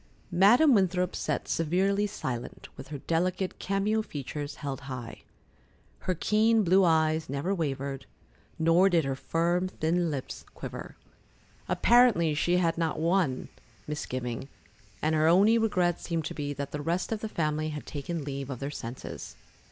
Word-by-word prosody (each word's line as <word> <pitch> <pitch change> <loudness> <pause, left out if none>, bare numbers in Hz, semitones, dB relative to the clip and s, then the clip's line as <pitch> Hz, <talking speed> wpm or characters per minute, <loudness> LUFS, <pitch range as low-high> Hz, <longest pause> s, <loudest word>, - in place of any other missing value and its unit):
Madam 230 - +6
Winthrop 185 -3 +2
sat - - -2
severely 195 +5 +1
silent, 130 - -5
with - - -10
her 145 +1 -6
delicate, 180 +5 -1
cameo 200 +3 0
features 145 -4 -6
held 140 -2 -5
high. 125 -3 -7 0.8
Her 185 - -1
keen 220 +5 +3
blue 190 +2 +5
eyes 160 -2 +2
never 140 +8 -1
wavered, 140 -5 -3 0.5
nor 165 +4 +4
did 170 -5 +2
her 135 - -1
firm, 170 +6 0
thin 170 -1 0
lips 140 -4 -5
quiver. - - -7 0.7
Apparently, 230 -10 +4
she 175 +4 +2
had 170 -2 +1
not 165 -2 0
one 165 -5 +1 0.4
misgiving, 130 -3 -4 0.5
and 155 +1 +2
her 155 0 +3
only 200 +7 +5
regret 180 -6 +1
seemed 165 -3 -2
to - - -4
be 145 -1 -3
that 140 -1 -5
the 150 - -4
rest 170 +7 -1
of 220 - -1
the 220 - -4
family 155 -3 -1
had 150 -1 -6
taken 150 +2 -4
leave 140 -1 -5
of 130 - -4
their 140 +4 -4
senses. 120 -3 -7
165 Hz, 150 wpm, -28 LUFS, 145-185 Hz, 0.8 s, Madam